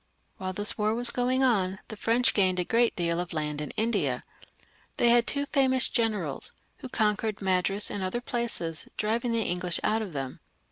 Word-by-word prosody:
While 185 0 -4
this 205 +3 +2
war 215 +1 +1
was 240 0 +7
going 255 +2 0
on 195 -7 +2
the 215 - -6
French 230 +4 +2
gained 185 -3 +2
a - - +2
great 235 +3 +2
deal 170 -1 0
of 175 -1 -4
land 150 -1 -2
in 150 - -4
India. 225 -1 0 0.7
They 240 - +4
had 240 0 +4
two 285 0 0
famous 260 -2 +2
generals, 210 - 0 0.2
who 260 - -9
conquered 215 -2 0
Madras 195 +1 +1
and 205 - -3
other 185 +5 -2
places, 235 -10 -4
driving 230 +3 0
the 230 -1 +1
English 180 -1 -1
out 220 +1 +1
of 200 -6 -6
them. 135 -2 -5
210 Hz, 185 wpm, -27 LUFS, 180-235 Hz, 0.7 s, was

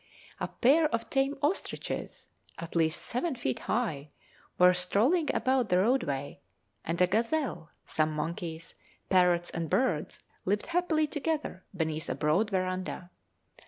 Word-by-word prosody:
A - - -1
pair 305 +6 +4
of 230 -5 -3
tame 275 +2 +1
ostriches, 315 +7 -3 0.3
at 165 0 -8
least 160 0 +1
seven 265 +5 -1
feet 130 - -2
high, 160 - -2 0.5
were 180 0 +7
strolling 225 - +2
about 260 -1 +1
the 180 - +4
roadway, 185 - 0 0.4
and 165 +1 -2
a - - +7
gazelle, 230 - -1 0.2
some 155 0 0
monkeys, 165 +1 -4 0.4
parrots, 180 -2 +3
and 165 -1 -3
birds 180 - 0 0.2
lived 205 +2 0
happily 335 -3 +1
together 300 - -3
beneath 160 -1 -2
a 130 - -1
broad 155 +10 +2
verandah. 185 -1 -2
185 Hz, 130 wpm, -30 LUFS, 165-265 Hz, 0.5 s, were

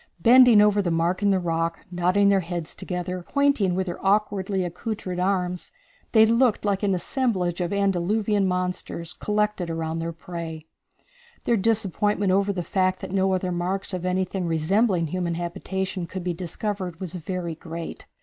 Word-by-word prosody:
Bending 240 0 +7
over 210 -1 +3
the 185 - -1
mark 170 +3 0
in 205 - +3
the 195 - +3
rock, 165 -1 -2
nodding 180 +3 +3
their 200 -1 +4
heads 170 -3 -5
together, 180 0 -4
pointing 280 -11 +2
with 190 0 0
their 175 -1 -6
awkwardly 195 -1 +1
accoutred 180 +1 -4
arms, 180 -1 -1 0.4
they 220 -1 +7
looked 230 -1 +2
like 200 -2 +1
an 200 -2 +2
assemblage 185 -4 -1
of 175 - -1
antediluvian 200 +1 +1
monsters 180 -2 -3
collected 210 -4 -1
around 165 0 -3
their 165 +1 -3
prey. 165 -1 -7 0.8
Their 235 - +2
disappointment 205 -2 +1
over 200 +1 +2
the 180 -3 -3
fact 185 +1 0
that - - -6
no 190 0 +2
other 185 0 -2
marks 185 +3 -2
of 180 -1 -3
anything 185 0 -1
resembling 175 +3 +2
human 170 +1 -2
habitation 180 +1 -3
could 185 +1 -6
be 180 0 -1
discovered 180 +1 -4
was 185 -3 -5
very 180 -1 -4
great. 165 +1 -8
185 Hz, 160 wpm, -25 LUFS, 175-200 Hz, 0.8 s, Bending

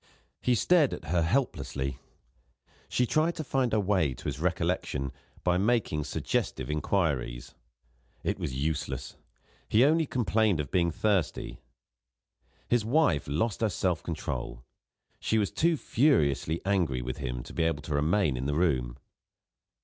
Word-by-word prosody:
He 125 - +2
stared 155 - +3
at - - -10
her 85 - +3
helplessly. 70 - -1 0.9
She 125 - +2
tried 155 +7 +1
to 155 - -4
find 135 -4 0
her 110 - +2
way 95 -9 +1
to - - -12
his - - -3
recollection 70 -1 -1 0.3
by 90 0 +2
making 100 -9 +1
suggestive 65 +2 -2
inquiries. 75 -6 -1 0.7
It - - -1
was - - -3
useless; 75 +3 -3 0.5
he 115 +5 +5
only 160 +1 +3
complained 110 -7 +1
of 70 -3 -3
being 85 -2 +2
thirsty. 95 0 -1 1.1
His 120 -2 +2
wife 115 - +2
lost 90 +12 -1
her 110 - +3
self 90 -2 0
control. 80 -6 -4 0.6
She 110 - +1
was 105 -3 +1
too 165 0 +2
furiously 85 - +2
angry 85 -11 +1
with 65 +1 -4
him - - -4
to - - -11
be - - -1
able 80 -3 0
to 75 - -4
remain 75 0 +2
in 65 +2 -2
the 70 - 0
room. 65 -8 +1
90 Hz, 145 wpm, -29 LUFS, 70-115 Hz, 1.1 s, he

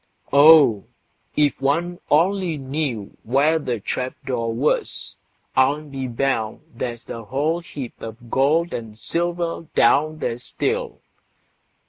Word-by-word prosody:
Oh! 140 -8 +7 0.5
if 145 -2 +2
one 170 +6 0
only 175 +1 +2
knew 135 -6 -4
where 140 +7 +2
the 125 -6 -3
trap 125 +5 -3
door 120 -4 -1
was, 125 +7 -1 0.4
I'll 140 +3 +3
be 135 -3 -5
bound 120 -3 -1
there's 120 0 -5
a 115 -1 -7
whole 150 +8 0
heap 140 -7 -8
of 115 +1 -9
gold 155 +6 +2
and 110 -2 -6
silver 170 +4 -2
down 155 +6 +4
there 120 -5 -3
still! 460 - -3
140 Hz, 120 wpm, -22 LUFS, 120-160 Hz, 0.5 s, Oh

